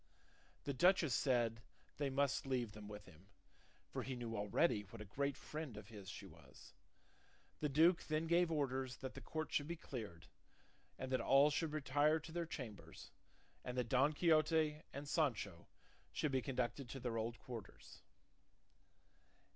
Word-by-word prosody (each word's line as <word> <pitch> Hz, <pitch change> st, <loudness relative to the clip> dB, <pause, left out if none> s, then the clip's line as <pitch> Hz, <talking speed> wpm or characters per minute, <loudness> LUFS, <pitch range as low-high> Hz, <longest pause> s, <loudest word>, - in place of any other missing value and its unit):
The 140 Hz, -, -2 dB
duchess 175 Hz, -1 st, +4 dB
said 120 Hz, -4 st, +2 dB, 0.4 s
they 145 Hz, -1 st, 0 dB
must 140 Hz, 0 st, +1 dB
leave 125 Hz, -4 st, 0 dB
them 105 Hz, 0 st, -9 dB
with 105 Hz, 0 st, -8 dB
him; 90 Hz, +1 st, -17 dB, 0.6 s
for -, -, -2 dB
he 130 Hz, -, -3 dB
knew 120 Hz, -2 st, -4 dB
already 105 Hz, +4 st, +2 dB
what 105 Hz, +3 st, -11 dB
a 105 Hz, -, -6 dB
great 140 Hz, +7 st, -1 dB
friend 150 Hz, -8 st, -6 dB
of 105 Hz, 0 st, -9 dB
his 100 Hz, -4 st, -9 dB
she 100 Hz, -, -7 dB
was. 75 Hz, -7 st, -15 dB, 0.9 s
The 150 Hz, -, 0 dB
duke 165 Hz, +5 st, +5 dB
then 155 Hz, +1 st, +1 dB
gave 170 Hz, +1 st, +4 dB
orders 135 Hz, -4 st, -1 dB
that 130 Hz, -, -6 dB
the -, -, -8 dB
court 155 Hz, -1 st, -4 dB
should 145 Hz, -, +1 dB
be 170 Hz, -, -2 dB
cleared, 110 Hz, -, -7 dB, 0.7 s
and 130 Hz, -, -4 dB
that 130 Hz, -, +2 dB
all 140 Hz, +2 st, +6 dB
should 155 Hz, +1 st, 0 dB
retire 150 Hz, +1 st, +3 dB
to 160 Hz, +1 st, -10 dB
their 170 Hz, 0 st, -2 dB
chambers, 120 Hz, -10 st, -8 dB, 0.5 s
and 125 Hz, 0 st, -4 dB
that 125 Hz, -2 st, 0 dB
Don 135 Hz, +5 st, +4 dB
Quixote 155 Hz, -1 st, +3 dB
and 140 Hz, +1 st, -6 dB
Sancho 110 Hz, -, 0 dB, 0.4 s
should 150 Hz, -, 0 dB
be 130 Hz, -1 st, +2 dB
conducted 125 Hz, -1 st, -2 dB
to 135 Hz, -, -5 dB
their 120 Hz, -2 st, -2 dB
old 115 Hz, +2 st, -2 dB
quarters. 115 Hz, -5 st, -9 dB
130 Hz, 165 wpm, -40 LUFS, 115-150 Hz, 0.9 s, all